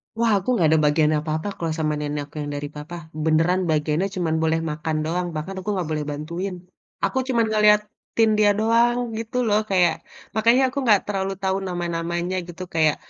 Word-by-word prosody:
Wah, 230 -1 +2
aku 195 - -6
nggak 165 -7 +3
ada 160 - +4
bagian 150 +1 +3
apa-apa 155 +4 -3
kalau 165 -2 -1
sama 155 -1 0
nenek 150 0 -3
aku 150 - -25
yang 145 0 -4
dari 145 0 -4
papa. 150 +4 -7 0.3
Beneran 165 +4 +2
bagiannya 155 +4 +1
cuman 165 -3 0
boleh 160 0 +2
makan 155 +1 -3
doang, 175 +2 -1
bahkan 185 +6 -4
aku 190 - -5
nggak 175 -4 -2
boleh 150 -1 -2
bantuin. 170 +6 -4 0.5
Aku 265 - -2
cuma 240 -3 +2
ngeliatin 210 +1 +2
dia 210 -1 +5
doang, 235 +2 +3 0.2
gitu 230 +2 -4
loh. 210 0 +3
Kayak, 180 -4 +4 0.4
makanya 230 +4 +4
aku - - -9
nggak 210 -4 +6
terlalu 195 -1 -2
tahu 190 0 +1
nama-namanya, 175 0 -2
gitu. 175 +1 -7
Kayak 160 -3 +2
175 Hz, 185 wpm, -23 LUFS, 155-210 Hz, 0.5 s, nggak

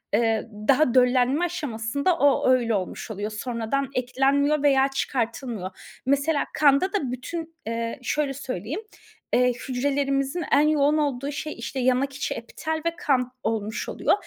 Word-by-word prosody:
ııı, 225 0 +1 0.2
daha 275 -2 +4
döllenme 255 +5 +4
aşamasında 285 -1 -1
o 285 -3 +3
öyle 240 -3 +3
olmuş 190 +3 -4
oluyor. 210 +1 -4
Sonradan 235 +4 -2
eklenmiyor 275 +4 +2
veya 270 -2 +5
çıkartılmıyor. 235 -7 -4
Mesela, 280 +3 +2
kanda 295 +6 +4
da 290 -12 -1
bütün, 325 +6 -6
ııı, 230 0 -2
şöyle 280 +2 -1
söyleyeyim, 260 - -4 0.5
ııı, 250 0 +4
hücrelerimizin 275 +5 -1
en 290 +2 +5
yoğun 300 0 +3
olduğu 280 -2 -1
şey, 305 +1 -4
işte, 235 +3 -5
yanak 260 +2 +2
içi, 280 - -2
epitel 320 0 -4
ve 335 0 0
kan 255 -6 +1
olmuş 215 -1 -2
oluyor. - - +1
270 Hz, 140 wpm, -25 LUFS, 240-290 Hz, 0.5 s, veya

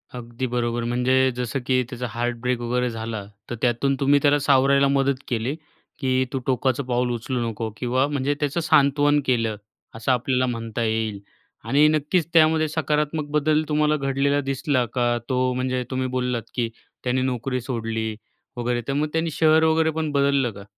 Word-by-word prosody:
अगदी 120 +1 -5
बरोबर. 120 -1 -1
म्हणजे 130 +2 +2
जसं 125 +2 -2
की 130 -1 +3
त्याचा 125 -2 -5
हार्टब्रेक 120 +2 -2
वगैरे 125 +1 -1
झाला, 110 -2 -5 0.3
तर 120 - -3
त्यातून 125 +3 +1
तुम्ही 145 +1 +4
त्याला 145 0 +4
सावरायला 140 0 +4
मदत 135 -1 +1
केली 120 +3 -1 0.4
की 130 -1 +1
"तू 135 - 0
टोकाचं 130 +1 +1
पाऊल 125 -1 0
उचलू 120 0 -2
नको" 110 +1 -4
किंवा 130 +4 +1
म्हणजे 145 -1 0
त्याचं 145 +2 -1
सांत्वन 145 -1 +3
केलं, 115 -4 +1 0.4
असं 115 +3 -1
आपल्याला 125 +1 +1
म्हणता 115 -2 -3
येईल. 110 -2 -1 0.4
आणि 140 +7 +4
नक्कीच 155 +2 +1
त्यामध्ये 160 -1 +4
सकारात्मक 150 0 -1
बदल 150 +1 +2
तुम्हाला 150 0 +2
घडलेला 140 +1 +1
दिसला 135 -1 0
का? 120 -1 +1
तो 130 -1 +1
म्हणजे 130 0 -1
तुम्ही 130 0 -1
बोललात 125 -2 -1
की 120 -2 0 0.3
त्यांनी 125 +1 0
नोकरी 130 0 -2
सोडली 115 -3 -3 0.4
वगैरे, 120 +2 -2
मग 150 +2 0
त्याने 165 0 0
शहर 160 +1 +4
वगैरेपण 160 -1 +1
बदललं 140 -3 +2
का? 100 -1 -11
130 Hz, 160 wpm, -23 LUFS, 120-145 Hz, 0.4 s, तुम्ही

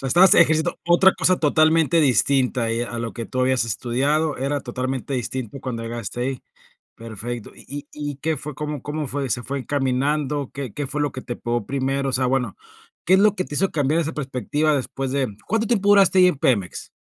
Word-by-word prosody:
sea, 135 - -2
estabas 180 +8 +6
ejerciendo 160 0 +3
otra 175 +2 +5
cosa 185 0 +2
totalmente 160 +2 +3
distinta 125 -3 +2
y, 115 +1 0
a 120 0 -5
lo 115 -1 -4
que 115 -2 -6
tú 130 - -3
habías 130 -2 +2
estudiado, 140 +7 0
era 140 +2 -1
totalmente 130 +2 -4
distinto 130 +1 -4
cuando 120 -4 -4
llegaste 115 0 -5
ahí. 130 0 -3 0.5
Perfecto, 115 +1 -7
¿y - - -15
y 145 +1 -7 0.2
y 140 - -7
qué 160 +2 -1
fue 145 +1 -7
cómo 150 -2 -4
cómo 150 -1 -4
fue? 135 0 -2
¿Se 120 - -1
fue 140 +2 -4
encaminando? 140 +1 -1
¿Qué 135 -5 -5
qué 145 - -3
fue 145 +3 -3
lo 145 -1 0
que 130 - -6
te 120 - -5
pegó 120 -2 -3
primero? 135 0 -1
O - - -7
sea, 130 0 +1
bueno, 125 -5 0 0.5
¿qué 185 - +5
es 190 - +6
lo 210 0 +4
que 185 - -1
te 145 - -8
hizo 195 - +2
cambiar 150 +2 +1
esa 160 0 -2
perspectiva 145 +2 -1
después 135 0 -3
de 140 -2 0 0.2
cuánto 225 0 +1
tiempo 205 -3 +1
duraste 195 -2 +5
ahí 180 - +7
en 180 - 0
Pemex? 100 -11 0
135 Hz, 210 wpm, -22 LUFS, 125-155 Hz, 0.5 s, ahí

